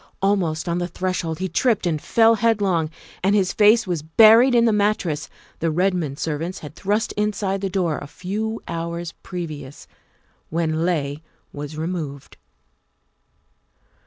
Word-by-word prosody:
Almost 185 Hz, -5 st, 0 dB
on 170 Hz, +1 st, 0 dB
the 175 Hz, -, -2 dB
threshold 180 Hz, -3 st, -3 dB
he 190 Hz, +2 st, -2 dB
tripped 230 Hz, +1 st, +1 dB
and 160 Hz, -4 st, 0 dB
fell 225 Hz, 0 st, +4 dB
headlong, 200 Hz, -8 st, +1 dB, 0.3 s
and 195 Hz, +2 st, +3 dB
his 190 Hz, -3 st, +2 dB
face 215 Hz, +1 st, +5 dB
was 175 Hz, -5 st, -2 dB
buried 225 Hz, -, +6 dB
in 235 Hz, 0 st, +5 dB
the 225 Hz, -, +3 dB
mattress 200 Hz, -7 st, 0 dB, 0.3 s
the 165 Hz, -, 0 dB
Redmond 175 Hz, -4 st, 0 dB
servants 165 Hz, +4 st, -3 dB
had 150 Hz, -, -9 dB
thrust 205 Hz, +5 st, -1 dB
inside 205 Hz, -2 st, -1 dB
the 195 Hz, -, -1 dB
door 175 Hz, -5 st, 0 dB
a 145 Hz, -, -8 dB
few 210 Hz, +8 st, -4 dB
hours 170 Hz, 0 st, -4 dB
previous, 155 Hz, -6 st, -7 dB, 0.6 s
when 160 Hz, 0 st, 0 dB
Leigh 145 Hz, -4 st, -1 dB, 0.3 s
was 145 Hz, +1 st, -7 dB
removed. 155 Hz, -4 st, -5 dB
180 Hz, 140 wpm, -22 LUFS, 160-205 Hz, 0.6 s, buried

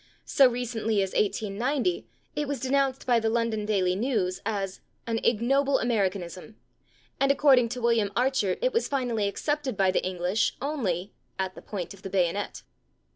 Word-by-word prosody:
So 270 Hz, -2 st, +5 dB
recently 225 Hz, -4 st, -1 dB
as 190 Hz, -, -4 dB
1890 240 Hz, -, 0 dB, 0.3 s
it 295 Hz, -1 st, -1 dB
was 285 Hz, -2 st, -2 dB
denounced 270 Hz, +1 st, 0 dB
by 245 Hz, -2 st, +4 dB
the 225 Hz, -, -1 dB
/London 225 Hz, -2 st, 0 dB
Daily 185 Hz, -4 st, +2 dB
News/ 205 Hz, -5 st, -1 dB
as 195 Hz, -3 st, -3 dB, 0.2 s
"an 230 Hz, -1 st, -1 dB
ignoble 270 Hz, +5 st, +2 dB
Americanism," 195 Hz, -3 st, -2 dB, 0.6 s
and 275 Hz, 0 st, +4 dB
according 265 Hz, -4 st, +5 dB
to 250 Hz, +1 st, -5 dB
William 230 Hz, -4 st, +2 dB
Archer 250 Hz, -6 st, +1 dB
it -, -, +2 dB
was 465 Hz, -, +1 dB
finally 245 Hz, -7 st, 0 dB
accepted 280 Hz, +2 st, -2 dB
by 190 Hz, -1 st, +3 dB
the -, -, 0 dB
English 185 Hz, +3 st, 0 dB
only 205 Hz, -, -2 dB, 0.2 s
"at 190 Hz, -1 st, -2 dB
the -, -, -11 dB
point 190 Hz, -3 st, -5 dB
of 195 Hz, -, -15 dB
the 195 Hz, -, -6 dB
bayonet." 190 Hz, +1 st, -1 dB
225 Hz, 160 wpm, -27 LUFS, 195-260 Hz, 0.6 s, So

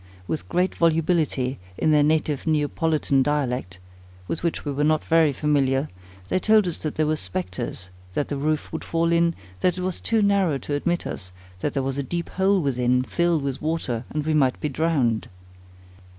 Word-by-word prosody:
With 160 Hz, -, -3 dB
great 180 Hz, +2 st, +1 dB
volubility, 160 Hz, -5 st, +1 dB, 0.2 s
in 155 Hz, -, +2 dB
their 150 Hz, -1 st, +5 dB
native 150 Hz, -1 st, +1 dB
Neapolitan 155 Hz, -2 st, +1 dB
dialect, 130 Hz, -9 st, -1 dB, 0.5 s
with -, -, -3 dB
which 170 Hz, -2 st, -2 dB
we 145 Hz, -, -1 dB
were 140 Hz, +1 st, -1 dB
not 155 Hz, 0 st, +2 dB
very 160 Hz, -2 st, +4 dB
familiar, 140 Hz, -1 st, +1 dB, 0.4 s
they 185 Hz, -, +1 dB
told 215 Hz, +1 st, +4 dB
us 175 Hz, -, -3 dB
that 155 Hz, -, -3 dB
there 155 Hz, -, +2 dB
were 155 Hz, +1 st, +1 dB
spectres, 95 Hz, -, -4 dB, 0.2 s
that 145 Hz, -, -1 dB
the 145 Hz, -, -3 dB
roof 150 Hz, +3 st, -1 dB
would 160 Hz, -, -4 dB
fall 165 Hz, 0 st, 0 dB
in, 170 Hz, 0 st, +3 dB, 0.2 s
that 180 Hz, -, +1 dB
it -, -, -3 dB
was 185 Hz, -1 st, -2 dB
too 225 Hz, -2 st, +1 dB
narrow 195 Hz, -7 st, +3 dB
to 145 Hz, -, -5 dB
admit 175 Hz, +4 st, 0 dB
us, 95 Hz, -2 st, -6 dB, 0.3 s
that 145 Hz, -, -2 dB
there 135 Hz, -, 0 dB
was 135 Hz, +1 st, -2 dB
a -, -, +2 dB
deep 170 Hz, +5 st, -4 dB
hole 190 Hz, -1 st, +2 dB
within, 125 Hz, -2 st, +2 dB
filled 170 Hz, +1 st, +1 dB
with 135 Hz, -1 st, -3 dB
water, 155 Hz, -7 st, -2 dB
and 150 Hz, -1 st, -3 dB
we 160 Hz, -, +1 dB
might 135 Hz, -4 st, +2 dB
be 150 Hz, -, -1 dB
drowned. 135 Hz, -7 st, 0 dB
150 Hz, 190 wpm, -24 LUFS, 135-165 Hz, 0.5 s, their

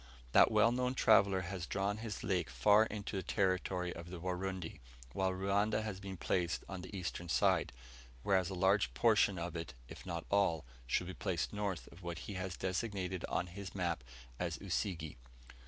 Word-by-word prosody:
That -, -, +7 dB
well 110 Hz, +1 st, +5 dB
known 125 Hz, +1 st, 0 dB
traveller 100 Hz, -5 st, +5 dB
has 90 Hz, -1 st, -4 dB
drawn 100 Hz, +1 st, 0 dB
his 110 Hz, -2 st, -5 dB
lake 90 Hz, -2 st, 0 dB
far 105 Hz, +1 st, +5 dB
into 100 Hz, -1 st, -5 dB
the 95 Hz, -, 0 dB
territory 90 Hz, -2 st, 0 dB
of 85 Hz, +1 st, -8 dB
the 90 Hz, -1 st, -6 dB
Warundi, 90 Hz, -1 st, -3 dB, 0.3 s
while 95 Hz, -1 st, +1 dB
Ruanda 100 Hz, +3 st, +1 dB
has 105 Hz, -3 st, -4 dB
been 95 Hz, -1 st, -6 dB
placed 85 Hz, 0 st, 0 dB
on 95 Hz, -2 st, -5 dB
the 95 Hz, +3 st, -8 dB
eastern 85 Hz, 0 st, -4 dB
side; 65 Hz, -4 st, +3 dB, 0.5 s
whereas 95 Hz, -2 st, +2 dB
a 95 Hz, -, -4 dB
large 95 Hz, +3 st, +3 dB
portion 105 Hz, -4 st, +4 dB
of 85 Hz, +1 st, -4 dB
it, 80 Hz, -5 st, -5 dB
if -, -, -10 dB
not 85 Hz, -3 st, -4 dB
all, 85 Hz, -8 st, +2 dB, 0.2 s
should 75 Hz, -, +1 dB
be 95 Hz, -, -5 dB
placed 90 Hz, 0 st, -2 dB
north 100 Hz, -9 st, -2 dB
of 85 Hz, -, -14 dB
what 85 Hz, -2 st, -4 dB
he 105 Hz, -, -5 dB
has 90 Hz, -1 st, -4 dB
designated 95 Hz, -2 st, -2 dB
on 90 Hz, -, 0 dB
his 95 Hz, +2 st, -8 dB
map 85 Hz, -8 st, -1 dB, 0.4 s
as 85 Hz, -2 st, -1 dB
Usige. 85 Hz, -, -2 dB
95 Hz, 180 wpm, -35 LUFS, 85-100 Hz, 0.5 s, That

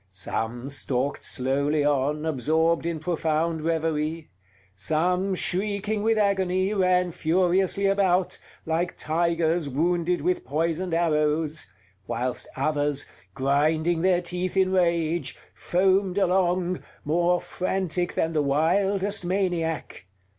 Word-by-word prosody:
Some 110 Hz, +6 st, -3 dB
stalked 140 Hz, -1 st, -2 dB
slowly 140 Hz, +3 st, 0 dB
on, 145 Hz, +2 st, 0 dB
absorbed 160 Hz, +3 st, +1 dB
in 170 Hz, -1 st, -2 dB
profound 160 Hz, 0 st, -1 dB
reverie; 160 Hz, 0 st, -2 dB, 0.4 s
some, 180 Hz, -, 0 dB
shrieking 205 Hz, +3 st, -1 dB
with 225 Hz, +1 st, +2 dB
agony, 190 Hz, -1 st, +1 dB
ran 180 Hz, -2 st, +2 dB
furiously 185 Hz, +4 st, +1 dB
about, 190 Hz, -2 st, +2 dB, 0.3 s
like 165 Hz, +2 st, -1 dB
tigers 165 Hz, -1 st, 0 dB
wounded 170 Hz, +5 st, 0 dB
with 180 Hz, -, 0 dB
poisoned 165 Hz, +5 st, -1 dB
arrows; 155 Hz, -2 st, +1 dB, 0.4 s
whilst 125 Hz, +1 st, -3 dB
others, 145 Hz, 0 st, 0 dB, 0.3 s
grinding 155 Hz, +5 st, +1 dB
their 180 Hz, -1 st, +2 dB
teeth 180 Hz, +2 st, -3 dB
in 190 Hz, -1 st, +3 dB
rage, 170 Hz, -2 st, 0 dB, 0.2 s
foamed 190 Hz, +1 st, +1 dB
along, 180 Hz, -1 st, +1 dB, 0.2 s
more 175 Hz, +3 st, +2 dB
frantic 180 Hz, -1 st, -2 dB
than 165 Hz, 0 st, 0 dB
the 155 Hz, -, +2 dB
wildest 190 Hz, +8 st, +1 dB
maniac. 175 Hz, -, -2 dB
170 Hz, 105 wpm, -25 LUFS, 155-185 Hz, 0.4 s, in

